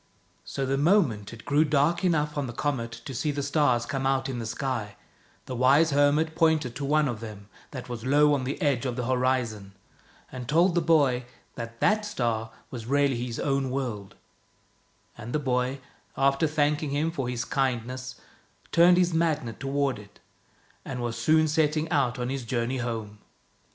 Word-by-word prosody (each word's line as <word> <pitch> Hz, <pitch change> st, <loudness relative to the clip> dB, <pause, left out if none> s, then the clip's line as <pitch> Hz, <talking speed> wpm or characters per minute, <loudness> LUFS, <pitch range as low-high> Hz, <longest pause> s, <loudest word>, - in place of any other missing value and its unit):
So 135 Hz, -, -3 dB
the 135 Hz, +1 st, 0 dB
moment 145 Hz, -, +2 dB
it 115 Hz, -2 st, -12 dB
grew 145 Hz, +2 st, +3 dB
dark 155 Hz, +4 st, +1 dB
enough 150 Hz, -4 st, +1 dB
on 145 Hz, -2 st, -2 dB
the 120 Hz, -, -6 dB
comet 120 Hz, -3 st, -2 dB
to 135 Hz, -, -6 dB
see 150 Hz, +5 st, -1 dB
the 145 Hz, -1 st, -2 dB
stars 140 Hz, -5 st, +2 dB
come 135 Hz, +1 st, -2 dB
out 135 Hz, 0 st, +1 dB
in 125 Hz, -2 st, -4 dB
the 115 Hz, -, -4 dB
sky, 125 Hz, -4 st, -3 dB, 0.5 s
the 130 Hz, -, -5 dB
wise 140 Hz, +6 st, +4 dB
hermit 145 Hz, +3 st, +3 dB
pointed 160 Hz, -7 st, +2 dB
to 140 Hz, -, -3 dB
one 150 Hz, +1 st, +2 dB
of 120 Hz, -4 st, -3 dB
them 105 Hz, -2 st, -9 dB, 0.2 s
that 130 Hz, -3 st, -8 dB
was 120 Hz, -2 st, -6 dB
low 145 Hz, +3 st, +4 dB
on 140 Hz, -2 st, 0 dB
the 130 Hz, +2 st, -3 dB
edge 140 Hz, -3 st, +1 dB
of 125 Hz, -, -3 dB
the 125 Hz, -1 st, -3 dB
horizon, 125 Hz, -6 st, -1 dB, 0.6 s
and 125 Hz, -2 st, -7 dB
told 170 Hz, +4 st, +4 dB
the 175 Hz, -, +2 dB
boy 145 Hz, -7 st, +3 dB, 0.3 s
that 115 Hz, -1 st, -7 dB
that 215 Hz, 0 st, +3 dB
star 115 Hz, -, -2 dB, 0.2 s
was 115 Hz, -3 st, -7 dB
really 140 Hz, -3 st, +1 dB
his 120 Hz, -, -5 dB
own 135 Hz, -1 st, 0 dB
world; 120 Hz, -7 st, -4 dB, 1.0 s
and 120 Hz, +1 st, -7 dB
the -, -, +2 dB
boy, 130 Hz, -1 st, -1 dB, 0.4 s
after 140 Hz, +3 st, +3 dB
thanking 150 Hz, 0 st, 0 dB
him 150 Hz, +4 st, 0 dB
for 135 Hz, -7 st, -3 dB
his 125 Hz, -1 st, -3 dB
kindness, 130 Hz, -1 st, -2 dB, 0.6 s
turned 175 Hz, +1 st, +6 dB
his 180 Hz, -1 st, +2 dB
Magnet 155 Hz, -8 st, 0 dB
toward 135 Hz, -2 st, -1 dB
it, 100 Hz, -1 st, -16 dB, 0.6 s
and 130 Hz, -2 st, -5 dB
was 120 Hz, -1 st, -3 dB
soon 155 Hz, +6 st, +3 dB
setting 155 Hz, 0 st, +1 dB
out 135 Hz, -5 st, +1 dB
on 125 Hz, 0 st, -3 dB
his 135 Hz, -1 st, -3 dB
journey 120 Hz, +2 st, -1 dB
home. 110 Hz, -4 st, -4 dB
135 Hz, 180 wpm, -27 LUFS, 120-150 Hz, 1.0 s, turned